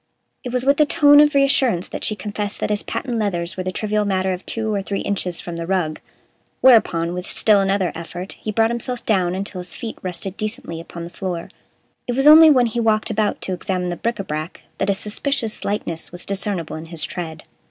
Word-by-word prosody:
It 250 - -5
was 250 +1 -1
with 280 +2 +3
a 300 - +6
tone 290 -2 +6
of 295 -1 +5
reassurance 265 -9 +3
that - - -6
she 215 - +1
confessed 210 0 -4
that - - -1
his 205 - +2
patent 245 -3 -3
leathers 175 -5 -2
were 185 - -3
the 185 0 -3
trivial 210 +2 -1
matter 190 -2 0
of 180 - -6
two 220 -1 -1
or 200 - 0
three 195 0 -3
inches 185 -4 -2
from 170 -1 -6
the 165 0 -5
rug. 175 -5 -1 0.6
Whereupon, 175 -9 +4
with 180 0 -5
still 210 -2 +3
another 195 -3 +1
effort, 175 +3 -7
he 215 - -3
brought 225 +2 +2
himself 240 +1 -4
down 185 -4 +1
until 195 -1 -4
his 180 - -5
feet 230 -2 -6
rested 185 +1 -4
decently 215 -7 -4
upon 170 0 -9
the 170 - -8
floor. 180 -3 -4 0.6
It 245 - -1
was 270 +2 +2
only 315 +1 +10
when 255 -5 +5
he 235 +1 -2
walked 220 0 +1
about 215 -1 0
to 190 - -3
examine 180 0 -2
the 175 - -2
bric 235 +6 -2
Ã 195 - -5
brac 155 +2 -5 0.2
that 195 - 0
a 200 - +2
suspicious 220 +3 -3
lightness 170 -5 -2
was 175 0 -7
discernible 195 -5 -2
in 160 - -8
his 165 -1 -1
tread. 160 -3 -5
200 Hz, 220 wpm, -21 LUFS, 180-230 Hz, 0.6 s, only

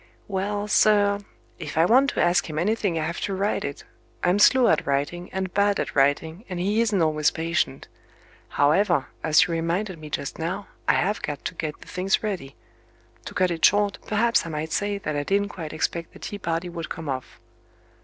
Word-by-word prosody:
"Well, 205 +1 -2
sir, 205 -1 +4 0.4
if 155 -2 -6
I 165 - +5
want 260 +8 +5
to - - -4
ask 175 0 +2
him 155 - -5
anything 195 0 0
I 155 - -1
have 170 +1 -4
to 195 - -2
write 200 +2 0
it. 140 0 -5 0.4
I'm 180 +3 +3
slow 250 +3 +6
at - - +2
writing, 145 +6 -1
and 190 -1 -3
bad 200 0 +2
at - - -3
writing, 155 +6 +1
and 180 -2 -4
he 205 +5 +1
isn't 210 -6 +2
always 155 -1 +2
patient. 165 -4 -2 0.6
However, 150 0 +2
as 155 -1 +5
you - - -5
reminded 170 +3 -2
me 155 -1 -9
just 140 +1 -4
now, 185 +5 -3 0.2
I - - +5
have 205 +4 0
got 145 -2 -5
to - - -2
get 155 -2 -5
the - - -14
things 190 +4 0
ready. 185 -11 -4 0.7
To - - -8
cut 185 -1 +2
it 165 -1 -4
short, 205 0 +4
perhaps 230 +2 +2
I 165 - -6
might 155 0 -4
say 205 0 0
that 155 -6 -4
I 145 - 0
didn't 200 +6 0
quite 160 -6 -7
expect 165 +1 -3
the - - -12
tea 205 - -6
party 165 -1 -2
would 170 -2 -6
come 160 -2 -6
off." 130 -2 -5
175 Hz, 205 wpm, -25 LUFS, 160-205 Hz, 0.7 s, slow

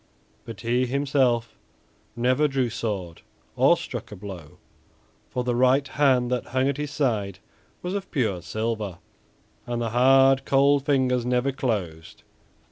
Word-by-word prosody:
But 115 -5 -9
he 125 +2 +1
himself 130 -4 0 0.6
never 125 +5 +2
drew 135 -4 -1
sword 95 -8 -4 0.3
or - - +4
struck - - -7
a - - -7
blow, 90 -6 -10 0.7
for 125 - -2
the 125 0 -1
right 130 +3 +3
hand 130 -4 +2
that 125 - -1
hung 130 +1 0
at 140 -1 -1
his 150 0 -3
side 110 -10 -1 0.5
was 180 +1 -3
of 200 -1 -4
pure 110 - -1
silver, 110 -1 -3 0.7
and 120 -1 -2
the 115 -2 -2
hard, 135 +2 +5
cold 140 +1 +3
fingers 130 -3 +2
never 125 +2 0
closed. 95 -12 -4
125 Hz, 140 wpm, -25 LUFS, 110-135 Hz, 0.7 s, hard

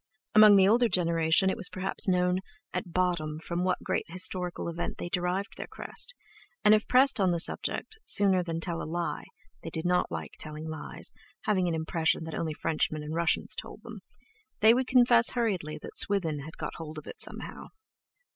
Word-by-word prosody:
Among 215 -1 +8
the 190 -1 +6
older 235 +3 +4
generation 170 0 +2
it - - -4
was 200 -6 +4
perhaps 190 +2 -2
known 180 0 +2 0.3
at 175 - -4
bottom 170 -4 -1
from 170 +2 -3
what 185 0 -1
great - - -2
historical 180 0 +1
event 170 0 -4
they 175 - -5
derived 180 +4 -2
their - - -6
crest; - - -2 0.5
and 210 - +7
if 215 0 +2
pressed 255 -1 +4
on 190 -2 +3
the 170 -1 0
subject, 440 - 0
sooner 195 -2 +4
than 165 -2 -4
tell 170 0 -3
a - - -6
lie—they 170 - -6
did 160 +1 -4
not 180 0 +1
like - - -5
telling 155 0 -7
lies, 155 -2 -5 0.3
having 190 -4 +1
an 170 - -1
impression 160 0 0
that 160 0 -7
only 160 -2 -3
Frenchmen 155 -1 -1
and 150 +1 -6
Russians 170 +1 0
told - - -8
them—they 260 - -1
would 255 +1 0
confess 240 -2 +5
hurriedly 195 -11 -2
that - - -9
Swithin 170 -7 0
had 155 +3 -10
got - - -5
hold 155 -1 -8
of 155 - -8
it - - -8
somehow. - - -5
180 Hz, 185 wpm, -28 LUFS, 165-205 Hz, 0.5 s, Among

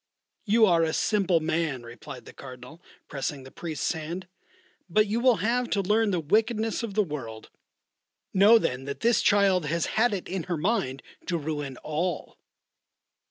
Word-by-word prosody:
"You 220 +2 +5
are 170 -4 +4
a 160 -1 +1
simple 195 -5 +2
man," 155 -5 -1
replied 120 +2 -10
the - - -12
Cardinal, 130 +4 -11 0.3
pressing 135 0 -4
the 130 - -12
Priest's 160 -4 -3
hand; 170 +3 -5 0.6
"but 215 +5 +4
you 220 +2 -1
will 250 -1 +4
have 240 +3 0
to 200 - +1
learn 215 +3 +2
the 180 -3 0
wickedness 220 +8 +1
of 220 -4 -5
the 215 - +4
world. 125 - -7 0.8
Know 205 +4 +7
then 130 - -2
that 140 0 -6
this 235 0 +3
child 195 -5 +3
has 170 +2 0
had 235 +2 +2
it 185 - -6
in 185 -3 -4
her 175 -2 -2
mind 155 - -1 0.2
to 175 - 0
ruin 145 -4 -4
all." 160 +2 -3
175 Hz, 165 wpm, -27 LUFS, 145-210 Hz, 0.8 s, Know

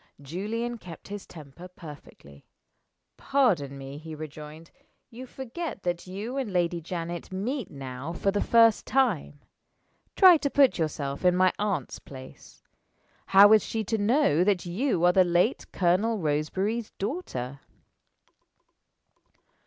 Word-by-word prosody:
Julian 215 - -4
kept 170 -2 -12
his 205 -1 -7
temper 160 +2 -12
perfectly. 145 - -14 0.7
"Pardon 185 - +1
me," 135 +1 -8
he 160 0 -9
rejoined, 155 +1 -10 0.4
"you 250 +3 -9
forget 265 - -7
that 175 0 -3
you 210 +8 -5
and 260 -7 -3
Lady 175 -1 0
Janet 170 +1 -6
meet 230 +6 -3
now 135 +1 -7
for 195 +3 -1
the 205 - -1
first 230 -2 +4
time. 210 - 0 0.7
Try 370 -4 +8
to 285 - -2
put 275 -8 +3
yourself 145 -2 -3
in 180 -1 +4
my 185 0 +3
aunt's 205 -3 -2
place. 130 -1 -13 0.6
How 200 +2 +8
is 215 - +5
she 220 -1 -3
to 220 +2 -2
know 210 - +3
that 190 -2 +1
you 180 0 0
are 180 - +5
the 185 - +5
late 175 +7 0
Colonel 195 +6 +1
Roseberry's 190 +8 -1
daughter?" 140 - -4
185 Hz, 130 wpm, -27 LUFS, 155-225 Hz, 0.7 s, Try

